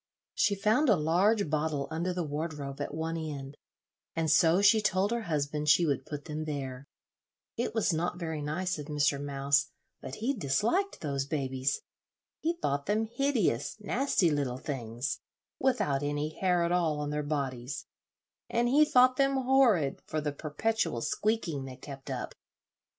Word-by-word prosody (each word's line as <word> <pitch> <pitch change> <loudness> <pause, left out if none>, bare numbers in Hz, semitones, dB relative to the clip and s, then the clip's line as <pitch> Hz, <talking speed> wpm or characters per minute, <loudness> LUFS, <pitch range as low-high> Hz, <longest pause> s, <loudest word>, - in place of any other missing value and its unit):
She 200 - +2
found 220 +9 +2
a 215 - +7
large 185 +6 +2
bottle 150 -2 -1
under 170 +3 -1
the 180 -1 -2
wardrobe 150 -2 -4
at - - -3
one 160 +1 -3
end, 145 -3 -5 0.6
and 160 -2 +1
so 165 +3 +5
she 205 +2 +5
told 195 0 +1
her 235 0 0
husband 150 0 0
she 160 +4 +6
would 145 -3 -1
put 145 -1 -6
them 155 +1 -4
there. 140 -3 -5 0.7
It 235 -1 -2
was 210 -5 +2
not 175 +2 -1
very 160 -3 -3
nice 170 +4 -2
of 150 - -7
Mr. 145 -2 +1
Mouse, 140 0 +1 0.3
but 130 - -6
he 245 +6 -1
disliked 230 - 0
those 140 -3 -2
babies. 135 -2 -1 0.6
He 330 +2 0
thought 140 - -1
them 215 +2 +1
hideous, 220 - 0
nasty 210 - +1
little 140 -4 -1
things, 125 -2 -4 0.4
without 245 - +1
any 145 +1 -1
hair 180 -2 +2
at 170 - 0
all 165 -4 +1
on 145 0 -2
their 150 0 -1
bodies, 140 -3 -3 0.6
and 235 +1 +1
he 285 +5 +6
thought 255 -3 +5
them 275 0 +3
horrid 250 - +3
for 155 - -1
the 150 -1 -2
perpetual 155 - -1
squeaking 175 - -1
they 130 -1 -8
kept 135 0 -9
up. - - -4
155 Hz, 160 wpm, -30 LUFS, 140-205 Hz, 0.7 s, a